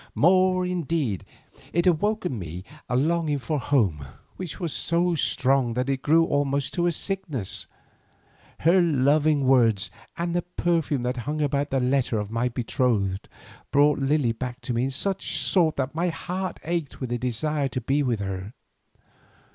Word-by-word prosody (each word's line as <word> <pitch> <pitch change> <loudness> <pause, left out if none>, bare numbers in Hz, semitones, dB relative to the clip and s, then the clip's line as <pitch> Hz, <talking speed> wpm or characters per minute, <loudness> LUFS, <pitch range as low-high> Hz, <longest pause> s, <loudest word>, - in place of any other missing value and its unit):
More 185 +2 +4
indeed, 165 - -1 0.5
it 170 +2 +1
awoke 205 +5 +2
in 130 -10 -2
me 90 +1 -6 0.3
a 125 - 0
longing 155 +2 +1
for 150 +2 -2
home 100 - +1 0.3
which 180 -6 -6
was 170 -4 -2
so 170 +1 +1
strong 130 -5 +1
that 125 +2 -1
it 135 -1 -1
grew 165 +4 +4
almost 140 -2 0
to 175 0 +1
a - - +2
sickness. 165 - -3 0.9
Her 175 +4 +5
loving 150 -1 +3
words 115 -7 +3 0.3
and 170 0 -2
the 175 - +2
perfume 165 -6 -1
that 125 +1 -1
hung 155 +1 -1
about 145 -1 0
the 135 - +1
letter 125 -2 +1
of 105 0 -3
my 115 +2 0
betrothed 115 -5 -1 0.4
brought 145 +1 +4
Lily 135 -3 +2
back 125 +2 -5
to 120 0 -3
me 120 +2 +1
in - - -1
such 190 +8 -2
sort 165 -5 +2
that 135 +1 -2
my 170 +3 0
heart 185 +2 -4
ached 165 -3 -3
with 130 -2 -4
a 120 - -1
desire 140 +4 0
to 130 - -3
be 135 +5 0
with 120 -6 0
her. 95 +2 -5
140 Hz, 165 wpm, -25 LUFS, 125-170 Hz, 0.9 s, Her